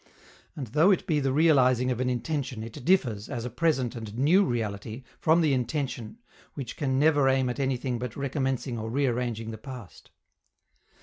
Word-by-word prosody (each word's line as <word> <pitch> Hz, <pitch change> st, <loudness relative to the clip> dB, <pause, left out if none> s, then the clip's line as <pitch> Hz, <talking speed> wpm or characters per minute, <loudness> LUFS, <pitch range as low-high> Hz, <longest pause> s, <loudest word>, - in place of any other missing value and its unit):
And 140 Hz, -, -4 dB
though 150 Hz, -, +3 dB
it 195 Hz, -, +2 dB
be 155 Hz, -3 st, +1 dB
the 135 Hz, -2 st, 0 dB
realizing 130 Hz, -4 st, +4 dB
of 125 Hz, -, -2 dB
an 130 Hz, 0 st, 0 dB
intention, 125 Hz, -1 st, -3 dB
it 115 Hz, +1 st, -9 dB
differs, 125 Hz, -, +1 dB
as 120 Hz, -4 st, -4 dB
a 125 Hz, -, -5 dB
present 130 Hz, -3 st, 0 dB
and 110 Hz, -1 st, -7 dB
new 165 Hz, +10 st, +4 dB
reality, 115 Hz, -, -3 dB, 0.2 s
from 160 Hz, +2 st, +4 dB
the 155 Hz, -4 st, +3 dB
intention, 130 Hz, -, -3 dB, 0.4 s
which 135 Hz, -5 st, -6 dB
can 130 Hz, -3 st, -1 dB
never 145 Hz, -2 st, +4 dB
aim 130 Hz, -1 st, +2 dB
at 125 Hz, -, -7 dB
anything 130 Hz, -2 st, -1 dB
but 125 Hz, -1 st, -5 dB
recommencing 135 Hz, -3 st, -2 dB
or 110 Hz, +1 st, -4 dB
rearranging 120 Hz, -3 st, -1 dB
the 110 Hz, -, -8 dB
past. 125 Hz, -5 st, -10 dB
130 Hz, 175 wpm, -27 LUFS, 120-145 Hz, 0.4 s, realizing